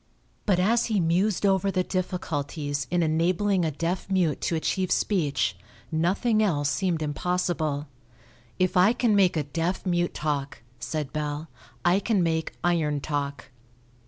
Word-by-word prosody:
But 195 -4 +4
as 225 +6 +3
he 215 -4 +1
mused 180 +5 +1
over 195 0 +3
the 185 -1 +1
difficulties 145 -6 -3
in 175 -1 +2
enabling 180 +4 +1
a 160 - +1
deaf 170 +6 -3
mute 180 -6 +1
to 170 - 0
achieve 185 +3 -1
speech 145 - +1 0.4
nothing 195 +8 +2
else 145 -9 +1
seemed 175 -2 0
impossible. 155 -1 -1 0.7
"If 185 +1 +1
I 185 +5 +5
can 240 -3 +2
make 185 -4 +4
a 150 - +1
deaf 165 +7 -2
mute 175 -1 0
talk," 145 -5 -3 0.2
said 150 -3 -4
Bell, 150 +1 -3 0.4
"I 175 +2 +4
can 205 -3 +1
make 160 -1 -1
iron 160 -4 +1
talk." 140 -2 -4
175 Hz, 145 wpm, -26 LUFS, 150-190 Hz, 0.7 s, I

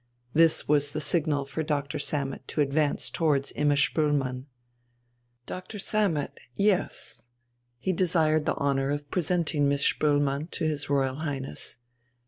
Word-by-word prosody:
This 165 0 +4
was 145 -1 +3
the 155 - -1
signal 150 -2 0
for 150 +3 -4
Doctor 150 -1 -2
Sammet 140 -2 -3
to 150 - 0
advance 145 +1 +1
towards 145 -4 +1
Imma 145 -1 +3
Spoelmann. 140 -4 +1 1.0
"Doctor 185 +4 -7
Sammet. 195 -7 0 0.2
Yes." 200 -9 0 0.5
He 185 +10 -1
desired 160 -4 +2
the - - +2
honour 135 -1 +1
of 145 0 -3
presenting 170 -4 +1
Miss 140 0 +2
Spoelmann 145 +1 +1
to - - -2
his 145 -2 -2
Royal 135 -2 +1
Highness.... 140 -4 -4
145 Hz, 130 wpm, -27 LUFS, 140-160 Hz, 1.0 s, This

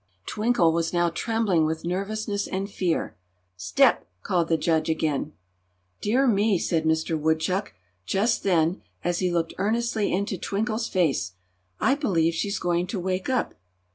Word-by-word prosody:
Twinkle 210 -6 +2
was 165 0 -1
now 175 -1 +2
trembling 205 -2 +1
with 160 +1 -3
nervousness 200 +3 -2
and 195 +1 -3
fear. 185 -4 -2 0.4
"Step!" 90 -1 +2 0.2
called 170 -2 +1
the 165 - +2
judge, 160 0 +1
again. 155 -2 -1 0.7
"Dear 250 +6 +2
me!" 210 -4 +3
said 160 -1 0
Mister 160 +1 +1
Woodchuck, 160 +5 0 0.3
just 220 +4 +1
then, 175 -2 +1 0.2
as 175 0 0
he 180 -1 +1
looked 170 -1 -1
earnestly 220 +1 0
into 195 0 -1
Twinkle's 220 +2 -1
face, 140 - 0 0.5
"I 270 - +3
believe 180 - +1
she's 200 +5 -1
going 175 0 0
to 200 0 -3
wake 185 +3 -2
up!" 255 -1 0
180 Hz, 145 wpm, -25 LUFS, 165-210 Hz, 0.7 s, me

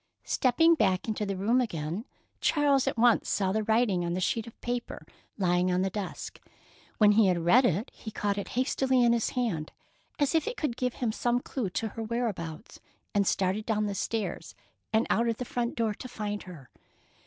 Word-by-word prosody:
Stepping 315 +6 +4
back 190 - +1
into 215 -1 -2
the 195 -1 -2
room 230 +7 +2
again, 170 -1 -3 0.3
Charles 285 -3 +2
at 270 - -1
once 235 0 +4
saw 190 -2 +1
the 220 +2 0
writing 220 -4 +2
on 170 0 -2
the - - -1
sheet 225 +5 -1
of 230 - -13
paper 240 0 -4 0.3
lying 180 -2 +2
on 180 +1 +1
the 190 - -1
desk. 200 -2 -6 0.6
When 210 -1 +6
he 210 -1 +5
had 175 -3 +1
read 245 +9 +6
it, 200 - 0
he 220 - -8
caught 205 -1 -1
it 200 - -5
hastily 260 0 +2
in 235 0 +5
his 235 -2 +1
hand 185 -11 -1 0.5
as 285 +1 +1
if 325 -2 +1
it 475 - -3
could 295 -7 -1
give 250 -1 -2
him 240 -3 -1
some 240 +2 0
clue 245 -4 -3
to 220 +5 -2
her 225 - -7
whereabouts, 215 -9 -4 0.3
and 200 -2 +2
started 195 +3 0
down 215 -2 +1
the 205 - -2
stairs 215 +2 -3 0.4
and 220 +1 +3
out 235 +1 +2
of 225 - -1
the 250 - -4
front 240 0 -2
door 225 -2 0
to 255 - -9
find 210 -4 -4
her. 145 -8 -12
220 Hz, 200 wpm, -29 LUFS, 195-245 Hz, 0.6 s, When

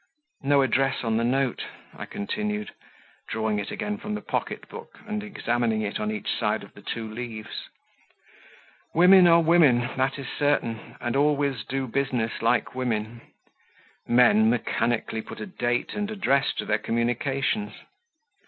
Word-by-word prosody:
No 140 0 +4
address 135 +1 +1
on 110 -1 +1
the 115 - +1
note" 130 +1 0 0.3
I - - -7
continued, 210 - -3 0.6
drawing 110 -1 -1
it 100 - -4
again 210 0 -3
from 210 0 -4
the 210 - -5
pocket - - -3
book - - -11
and 215 0 -3
examining 120 - -1
it 105 - -3
on 105 - -1
each 105 -1 -2
side - - 0
of - - -14
the - - -14
two 115 -1 -4
leaves: 110 -1 -7 1.3
"women 180 +2 +8
are 170 0 +7
women, 155 -7 +5 0.2
that 130 +1 +1
is 140 - -6
certain, 140 -6 0
and 120 0 -2
always 140 -4 +1
do 135 0 -2
business 125 -3 -1
like 115 0 +1
women; 115 -2 -2 0.9
men 115 -3 +5
mechanically 115 -1 0
put - - -10
a - - -4
date 120 -11 -2
and 210 0 -2
address 140 -10 +1
to - - -3
their 105 0 +1
communications. 135 - -1
125 Hz, 150 wpm, -26 LUFS, 115-150 Hz, 1.3 s, women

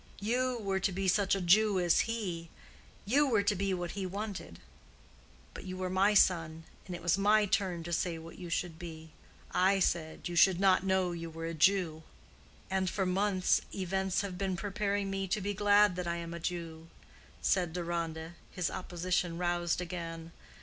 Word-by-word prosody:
You 250 +4 0
were 195 -3 -1
to 195 +1 0
be 190 +1 -2
such 195 +1 +3
a 195 - -2
Jew 200 +3 +4
as 175 +5 +2
he; 175 -7 -4 0.6
you 280 +8 +3
were 220 -6 +2
to 205 +1 +2
be 195 +1 -1
what 175 -2 -2
he 195 -2 -4
wanted. 195 - -6 1.0
But - - -9
you 185 0 -5
were 185 -1 -3
my 195 +3 +3
son, 165 -4 +3 0.2
and 180 - -5
it 170 - -9
was 175 +2 +2
my 210 +1 +4
turn 190 -4 0
to 170 +1 -5
say 170 0 0
what 165 +1 -11
you 175 -2 -7
should 170 -1 -2
be. 160 -2 -9 0.4
I 190 +2 +3
said 165 -3 -1
you 175 - -5
should 180 +1 +5
not 190 -1 +4
know 190 -2 +1
you 165 -1 -5
were 165 0 -7
a 165 - -3
Jew." 165 -1 +2 0.7
"And 190 -1 0
for 190 +2 -1
months 185 0 +2
events 190 0 -1
have 190 -3 -6
been 190 -2 -1
preparing 200 0 -1
me 195 0 -2
to 190 - 0
be 205 +1 -2
glad 205 -1 +4
that 180 -1 -3
I 170 - -1
am 170 0 -6
a 170 - -5
Jew," 165 -1 -5 0.6
said 180 -3 +2
Deronda, 170 -2 -3 0.2
his 180 -2 -2
opposition 180 -1 -2
roused 175 0 0
again. 165 -2 -6
185 Hz, 185 wpm, -31 LUFS, 170-195 Hz, 1.0 s, should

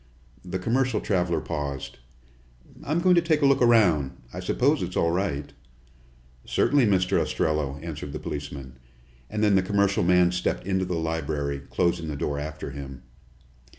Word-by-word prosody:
The 90 +1 -4
commercial 125 +5 0
traveler 90 -4 0
paused. 70 -4 -5 0.8
"I'm 155 +4 0
going 185 +1 +5
to 170 - +5
take 155 -3 +1
a - - +6
look 140 -1 +4
around. 90 - +4 0.2
I - - -5
suppose - - +1
it's - - -3
all 85 - +2
right." 85 -6 -2 0.9
"Certainly, 140 -5 +2
Mr. 90 -2 +2
Ostrello," 75 -3 -1
answered 75 -3 -6
the - - -4
policeman, 70 -3 -7 0.5
and 105 0 -2
then 105 -1 +4
the 95 - +5
commercial 100 0 +1
man 90 0 +4
stepped 90 0 -2
into 95 -1 0
the 90 -2 -2
library, 75 -3 -2
closing 85 -2 0
the 75 - -4
door 70 0 -2
after 75 -1 -6
him. 70 -1 -8
85 Hz, 155 wpm, -26 LUFS, 75-100 Hz, 0.9 s, a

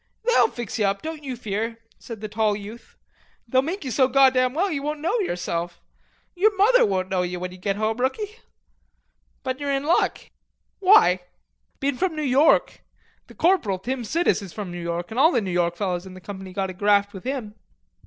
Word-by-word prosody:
"They'll 480 -1 +5
fix 235 -1 -6
ye 210 - +3
up, 195 0 -1
don't 315 -1 -6
you 265 -3 -4
fear," 225 0 -3 0.2
said 225 -3 -9
the 215 - -4
tall 215 0 +1
youth. 210 +3 -10 0.5
"They'll 255 +2 +3
make 325 +4 -4
you 260 - -3
so 260 +4 +3
goddam 260 -1 +4
well 380 +5 +1
ye 295 - -1
won't 300 +2 -3
know 355 +10 0
yerself. 175 - -3 0.5
Yer 385 +4 +4
mother 440 +6 +5
won't 185 -2 0
know 185 -1 +1
ye, 180 0 -3
when 180 0 -5
you 185 - -12
get 195 +1 -1
home, 215 +2 -1
rookie.... 415 - -2 1.0
But 260 0 -3
you're 285 -1 -3
in 275 0 0
luck." 325 +4 +2 0.6
"Why?" 370 - +6 0.6
"Bein' 275 -1 -1
from 370 0 0
New 305 - -3
York. 280 +3 +3 0.5
The - - -15
corporal, 330 - +2
Tim 245 +6 -4
Sidis, 330 +2 +1
is 190 -4 -9
from 205 -4 -6
New 175 0 -6
York, 170 +2 -4
an' 230 - -2
all 315 +5 +6
the 240 - +2
New 195 -4 -3
York 175 -1 +1
fellers 180 -1 -2
in 185 - -11
the - - -10
company 190 0 -8
got 190 0 -2
a - - -9
graft 205 +2 +2
with 190 - -9
him." 250 -5 -4
230 Hz, 205 wpm, -24 LUFS, 190-290 Hz, 1.0 s, Why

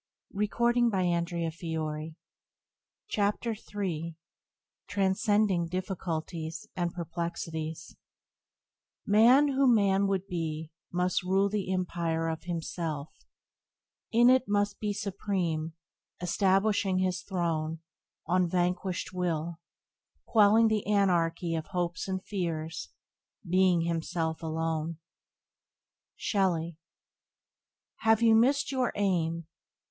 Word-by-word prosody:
Byways 205 +1 0
to 240 +1 +3
Blessedness - - -3
by 165 -3 -2 0.9
James 205 - +1
Allen 230 -2 -1
13 170 -6 -4 0.7
Transcending 200 -2 +2
Difficulties 170 -3 -4
and 175 -1 -1
Perplexities 165 -2 -5 1.1
"Man 240 +8 +6
who 270 -1 +4
man 200 -3 +3
would 195 -1 0
be 160 -3 -4 0.2
Must 180 +2 +1
rule 190 +2 +2
the 200 -2 -2
empire 170 -3 -1
of 160 0 -5
himself; 165 -3 -3 1.0
in 240 +2 +6
it 260 0 +4
Must 205 0 0
be 210 -1 -1
supreme, 180 -6 -2 0.5
establishing 195 +1 +2
his 185 -1 0
throne 165 -4 -2 0.4
On 180 +1 +2
vanquished 180 +1 -1
will, 170 -2 -2 0.7
quelling 220 +1 +5
the 215 -2 +1
anarchy 175 -4 +2
Of 160 -1 -3
hopes 175 0 -2
and 190 0 -3
fears, 165 - -3 0.6
being 180 -1 +4
himself 165 -1 -2
alone." 160 0 -2 1.2
—Shelley. 175 -5 0 1.2
"Have 225 +1 +3
you 225 -1 +6
missed 260 +7 +3
in 265 - -1
your 250 - +2
aim? 170 -5 0
180 Hz, 100 wpm, -29 LUFS, 165-205 Hz, 1.2 s, Man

